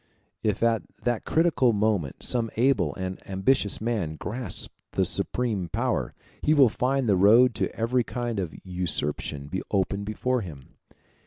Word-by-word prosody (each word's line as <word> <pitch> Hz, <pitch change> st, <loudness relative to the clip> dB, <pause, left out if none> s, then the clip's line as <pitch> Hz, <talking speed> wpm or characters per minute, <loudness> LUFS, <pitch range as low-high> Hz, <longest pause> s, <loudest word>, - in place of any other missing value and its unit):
If 105 Hz, 0 st, 0 dB
at 115 Hz, -2 st, +3 dB, 0.2 s
that 120 Hz, -2 st, -1 dB
critical 155 Hz, -7 st, +3 dB
moment 100 Hz, -9 st, 0 dB
some 115 Hz, -2 st, +1 dB
able 130 Hz, +3 st, +2 dB
and 95 Hz, -1 st, -5 dB
ambitious 100 Hz, +3 st, +1 dB
man 105 Hz, -9 st, -2 dB
grasps 110 Hz, +5 st, -3 dB, 0.3 s
the -, -, +2 dB
supreme 105 Hz, -8 st, -1 dB
power, -, -, -1 dB, 0.3 s
he 155 Hz, -, +3 dB
will 135 Hz, -5 st, +7 dB
find 130 Hz, +3 st, 0 dB
the 100 Hz, -, +4 dB
road 115 Hz, +7 st, +6 dB
to -, -, -2 dB
every 120 Hz, +2 st, +1 dB
kind 120 Hz, -3 st, -3 dB
of 90 Hz, -4 st, -4 dB
usurpation 75 Hz, -5 st, -3 dB, 0.2 s
open 100 Hz, 0 st, 0 dB
before 125 Hz, +4 st, -1 dB
him. 75 Hz, -9 st, -9 dB
110 Hz, 145 wpm, -26 LUFS, 95-125 Hz, 0.3 s, will